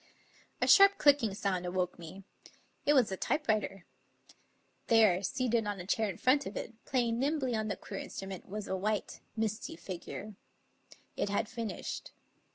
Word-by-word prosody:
A - - +2
sharp 395 0 +8
clicking 275 -9 +4
sound 190 -3 -1
awoke 180 0 -2
me. 175 +4 -10 0.6
It 295 - +5
was 250 -5 +4
the 190 - -3
typewriter. 215 - -1 1.0
There, 215 -6 +5
seated 235 0 0
on 205 -2 -3
a 180 - -6
chair 215 +2 +1
in 180 - -5
front 270 +2 +3
of 200 - -6
it, - - -5
playing 240 -3 0
nimbly 275 -2 0
on 215 -1 -1
the 205 - -2
queer 195 - -7
instrument, 195 -1 -7
was 210 +1 -5
a 190 - -1
white, 210 +2 -2 0.2
misty 220 -4 -2
figure. 185 +4 -7 0.8
It - - -1
had 205 +2 0
finished. 230 -2 -5
215 Hz, 160 wpm, -32 LUFS, 195-240 Hz, 1.0 s, sharp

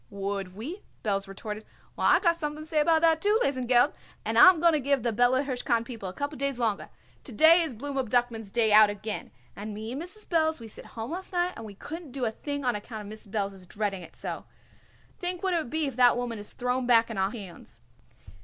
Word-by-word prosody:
"Would 195 -2 -4
we?" 310 - -6 0.2
Belz 195 -2 -1
retorted. 210 +2 -7 0.3
"Well, - - +1
I - - +6
got 340 -3 +3
something 305 -2 -4
to - - -12
say 310 -1 +2
about 320 +1 +3
that, 325 -1 +4
too, 415 +1 +3
Lesengeld, 255 0 +3 0.3
and - - -1
I'm 370 -3 +8
going 335 0 +5
to 305 - +2
give 275 -2 +1
the 235 - 0
Bella 245 +4 +3
Hirshkind 245 -4 0
people 225 -6 -6
a - - -8
couple 285 +3 -4
days 275 -2 -1
longer. 225 -4 -1 0.3
To - - -10
day 320 +9 +6
is 315 -7 -3
Blooma 270 0 -3
Duckman's 235 -3 0
day 220 0 +2
out 215 0 +8
again, 205 +1 -5 0.3
and 210 +1 -6
me 220 +2 -6
and 270 +4 -4
Mrs. 385 +5 -9
Belz 315 -3 +1
we 230 - -9
sit 215 - -11
home 225 +4 -4
last 370 +3 -6
night 355 0 0
and 225 - -8
we 205 -2 -10
couldn't 315 - -8
do 265 -3 -2
a 220 - 0
thing 285 +4 -5
on 245 -2 +2
account 210 0 -7
Mrs. 215 0 -11
Belz 200 -1 -2
is 185 -2 -12
dreading 200 -1 -3
it 165 -1 -12
so. - - -5 0.7
Think 360 +1 -2
what 380 -1 +1
it - - +3
would 310 - -5
be 315 +2 0
if 270 -4 -4
that 245 -1 +6
woman 240 -3 -3
is 205 - -7
thrown 250 0 -1
back 230 -1 +4
on 210 - -4
our 190 0 +2
hands." 190 - -10
245 Hz, 240 wpm, -28 LUFS, 215-305 Hz, 0.7 s, I'm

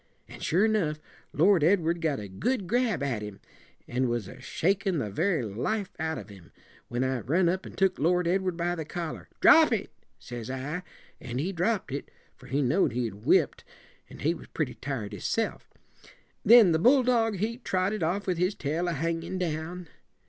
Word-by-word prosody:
An' - - -11
sure 185 +7 +2
enough, 180 -9 0 0.3
Lord 175 +1 +4
Edward 170 -1 +2
got 155 -4 0
a 105 - -6
good 205 - -1
grab 230 - +1
at 125 -7 -1
him, 105 -2 -7 0.5
and 125 +1 0
was 120 -5 -2
a - - -11
shakin' 190 +1 0
the 105 -8 -2
very 165 - +1
life 185 - -2
out 160 0 -1
of - - -9
him, 95 -5 -14 0.4
when 120 +1 -1
I 130 -1 0
run 170 +10 +1
up 185 +2 -1
and - - -12
took 190 -1 +2
Lord 175 +3 +2
Edward 185 -1 0
by 175 0 0
the 165 -2 -4
collar. 165 +1 -6
'Drop - - +7
it!' - - -1 0.3
says 120 - -8
I; 135 +7 -4 0.4
an' 125 -1 -6
he 165 +8 -1
dropped 190 - 0
it, 140 - -5 0.3
for - - -15
he 140 +2 0
know'd 140 - +2
he'd 120 -3 -2
whipped, 100 +2 +2 0.5
and - - -10
he 160 +3 +3
was 170 - -11
pretty 150 -6 -2
tired 115 -7 -5
hisself. 105 - -2 0.7
Then 225 -4 +8
the 160 - +2
bulldog, 245 - +4
he 225 +5 -2
trotted 190 -1 -1
off 180 +5 0
with 180 -3 -1
his 180 +3 +1
tail 160 +5 -2
a 175 - 0
hangin' 165 +4 -2
down. 170 0 -3
165 Hz, 185 wpm, -28 LUFS, 130-190 Hz, 0.7 s, Then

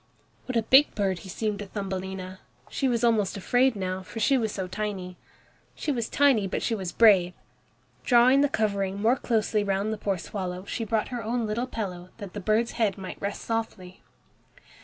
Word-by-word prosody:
What 255 -2 -1
a 230 - +2
big 265 +6 +5
bird 195 -3 0
he 190 - -11
seemed 210 +2 -2
to 205 - -6
Thumbelina! 190 -1 -5 0.3
She 270 - 0
was 240 -2 0
almost 215 -5 +2
afraid 245 +5 +2
now, 185 -1 -3
for 205 +4 -8
she 270 +5 +3
was 225 -5 0
so 190 -3 -4
tiny. 185 -2 -4 0.6
She 305 - -2
was 235 -4 -2
tiny, 270 -8 +3
but - - -3
she 230 - 0
was 190 -5 -3
brave. 190 -6 +5 0.7
Drawing 250 +2 +5
the 290 - +3
covering 200 -4 -1
more 225 +4 +3
closely 220 -4 0
round 200 +2 -1
the 215 - -6
poor 195 -2 -1
swallow, 180 +1 -5
she 225 +2 -3
brought 220 0 -1
her 245 -3 -4
own 235 +2 -1
little 225 +4 -2
pillow, 185 -7 -5
that 200 -5 -8
the 210 - -5
bird's 215 +4 +1
head 220 -4 0
might 190 -1 -8
rest 200 0 -4
softly. 220 -5 -4
210 Hz, 190 wpm, -26 LUFS, 190-230 Hz, 0.7 s, big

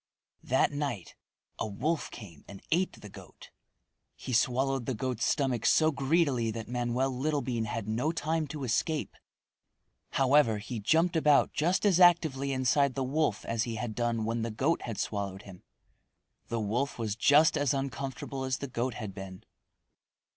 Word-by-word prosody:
That - - +2
night 140 - -4 0.5
a - - -1
wolf 145 +11 -2
came 90 -10 -11
and 100 - -11
ate 180 +3 +1
the 105 - -9
goat. 95 - -14 0.6
He 130 - -6
swallowed 130 +2 +1
the 130 - -1
goat's 125 0 -3
stomach 130 -6 0
so 160 0 +4
greedily 140 -4 +1
that 110 0 -5
Manoel 125 +2 -1
Littlebean 130 -3 -1
had 110 0 -4
no 120 +9 0
time 160 -1 -1
to 145 0 -6
escape. 140 +6 -1 1.0
However 135 -4 +4
he 115 +3 -5
jumped 165 - +2
about 150 -3 +4
just 175 +7 +1
as 190 -4 +4
actively 160 -6 +4
inside 130 +1 +2
the 135 - -1
wolf 140 -4 0
as 115 0 -1
he 115 -2 -4
had 110 0 -4
done 120 -1 -1
when 115 +1 -1
the 115 - -2
goat 135 +9 0
had 115 -4 -5
swallowed 100 -1 -3
him. 95 -3 -12 0.9
The 115 - -2
wolf 115 +6 -1
was 110 -3 -2
just 150 +6 +5
as 145 -2 +1
uncomfortable 135 0 -4
as 130 -1 -1
the 140 - -5
goat 125 -1 -2
had 110 -6 -6
been. 95 -1 -9
130 Hz, 160 wpm, -29 LUFS, 115-145 Hz, 1.0 s, just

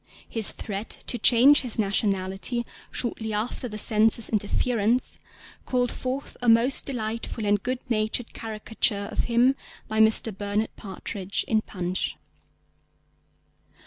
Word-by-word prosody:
His 225 -3 +2
threat 205 0 -6 0.2
to 240 - -1
change 265 +5 +7
his 245 -4 -2
nationality 200 +2 -1 0.2
shortly 220 -2 -3
after 220 +4 -2
the 215 -2 -7
Censor's 220 +2 +2
interference 225 +2 +1 0.5
called 245 -2 0
forth 260 +2 -5
a 245 - +2
most 230 +4 +4
delightful 230 -3 -4
and 205 0 +2
good 255 +2 -4
natured 220 0 -1
caricature 215 -2 -1
of - - -1
him 245 +3 +3 0.3
by 220 0 -2
Mr. 220 -1 +4
Bernard 205 +2 -2
Partridge 195 0 -4
in 220 -1 +2
Punch. 185 -3 -3
220 Hz, 120 wpm, -25 LUFS, 205-240 Hz, 0.5 s, change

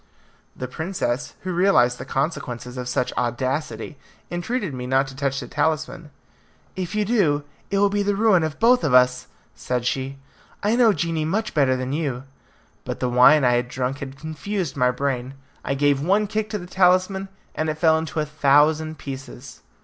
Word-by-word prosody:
The 125 - -5
princess, 145 -3 -3
who 185 -1 -4
realized 170 -10 +3
the - - -6
consequences 125 -4 -3
of 125 -1 -5
such 125 - -1
audacity, 130 +1 -3 0.3
entreated 175 - -2
me 125 -1 -5
not 135 +1 +2
to 135 - -11
touch 135 -1 -1
the - - -7
talisman. 155 +1 -2 0.7
"If 185 +2 -4
you 210 -1 +1
do, 180 -10 +2 0.3
it 200 - 0
will 200 +1 +4
be 205 0 +1
the 205 0 0
ruin 205 -4 +4
of 155 -1 -3
both 240 -1 +4
of 140 -5 +2
us," 125 0 +4 0.3
said 125 -1 -3
she; 135 +2 -2 0.5
"I 210 +3 +2
know 240 -2 +5
genii 165 -5 -1
much 210 +7 -1
better 135 -4 +3
than 130 +1 -3
you." 140 -5 -2 0.6
But - - -5
the 125 - 0
wine 125 +4 +6
I 125 - +4
had 120 0 +1
drunk 130 +2 -3
had 135 0 -7
confused 160 +3 -4
my 125 -2 +3
brain; 130 0 -2 0.3
I 140 - -1
gave 140 0 +2
one 195 +7 +2
kick 215 +1 -2
to 210 - -2
the 175 - -8
talisman, 185 +1 +2 0.2
and 155 0 -2
it 155 - -1
fell 160 -1 +4
into 160 0 -4
a 155 - 0
thousand 150 +2 +2
pieces. 130 -2 -9
150 Hz, 185 wpm, -23 LUFS, 130-180 Hz, 0.7 s, wine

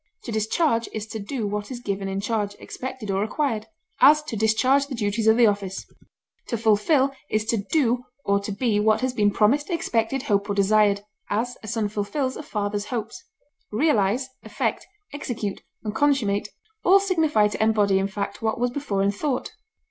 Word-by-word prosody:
To 235 - -6
discharge 230 +3 +1
is 215 -1 -4
to 220 - -5
do 220 +3 -3
what 205 0 -3
is 255 -2 -6
given 200 -4 -3
in 195 0 -2
charge, 205 -1 -1
expected, 255 -5 -6
or 195 0 0
required; 220 0 -1 0.3
as, 300 +3 +7
to 300 -6 -5
discharge 255 +6 +3
the 275 - -5
duties 215 0 -1
of 220 +1 +6
the 240 - +6
office. 200 -2 -1 0.6
To 235 - -1
fulfil 230 +6 +3 0.2
is 215 0 0
to 230 - +1
do 245 +2 +1 0.2
or 200 0 +3
to 200 +1 -5
be 210 0 +1
what 215 +1 +3
has 255 -1 0
been 210 -4 +3
promised, 235 - +2
expected, 265 -6 0
hoped, 200 -6 0
or 200 - 0
desired; 205 0 +3 0.3
as, 235 +4 -1
a 215 - -10
son 220 -1 -1
fulfils 235 +7 -2
a - - -6
father's 205 -5 -3
hopes. 235 - -5 0.5
Realize, 230 -1 +2
effect, - - -3 0.3
execute, 230 -8 -4 0.2
and 210 -2 -3
consummate 220 -7 +1 0.3
all 385 +2 +6
signify 320 - +2
to 210 - -4
embody 210 -3 +3
in 195 - 0
fact 200 +3 -5
what 220 +1 -1
was 245 0 +1
before 240 -8 -1
in 200 - +3
thought. 255 +5 -2
220 Hz, 180 wpm, -24 LUFS, 205-260 Hz, 0.6 s, as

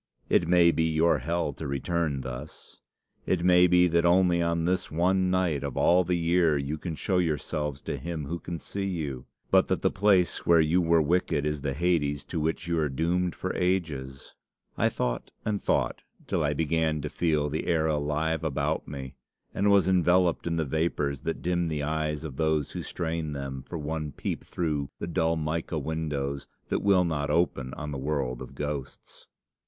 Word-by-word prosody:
'It 85 - +3
may 85 -1 +5
be 80 -1 +1
your 80 +2 +3
hell 85 -3 -1
to 80 - -6
return 75 +1 -1
thus. 65 +3 -9 0.5
It 85 -2 +1
may 90 0 +6
be 90 0 +5
that 85 -1 +2
only 85 0 +4
on 85 -1 0
this 90 +1 0
one 90 +3 +2
night 90 -6 +1
of 70 -3 -4
all 90 +1 +4
the 90 0 0
year 85 -2 +3
you 70 +3 -3
can 85 -1 -4
show 90 +3 0
yourselves 75 -3 -2
to 70 - -3
him 80 0 -4
who 85 +4 -4
can 85 0 -5
see 100 +4 -4
you, 75 -9 -4 0.2
but - - +5
that - - -1
the - - +3
place 95 -3 +2
where 85 -1 +5
you 80 +3 +3
were 85 -1 +3
wicked 75 -2 +1
is 75 -1 -2
the 70 -1 -2
Hades 75 -4 +1
to - - -4
which 80 +2 -2
you 85 -1 +1
are 75 -2 +1
doomed 85 +6 0
for 95 - -3
ages.' 80 -8 -2 0.4
I - - +2
thought - - -2 0.2
and 105 -2 -1
thought - - 0 0.2
till - - 0
I 75 0 +1
began 80 0 0
to 75 - -3
feel 75 -4 +1
the 80 - -3
air 80 -2 +2
alive 75 +1 0
about 80 -4 -1
me, 70 -2 -7 0.4
and 100 +1 +2
was 100 -3 +5
enveloped 90 -2 +3
in 85 - 0
the 80 -1 0
vapours 75 -2 -1
that 80 - -4
dim 85 -1 0
the 75 -2 -2
eyes 75 0 -2
of 70 -5 -7
those 80 -2 +1
who - - -5
strain 80 -3 -3
them 70 -1 -5
for 85 - -7
one 75 -1 -4
peep - - -4
through 75 -5 -2
the - - -4
dull 80 -1 +1
mica 80 +1 -2
windows 75 -3 -3 0.2
that - - +1
will 95 -3 +4
not 75 -3 -1
open 75 -5 +1
on 75 -1 -5
the 70 - -4
world 70 -3 -2
of - - -9
ghosts. 75 -2 -6
80 Hz, 190 wpm, -27 LUFS, 75-85 Hz, 0.5 s, may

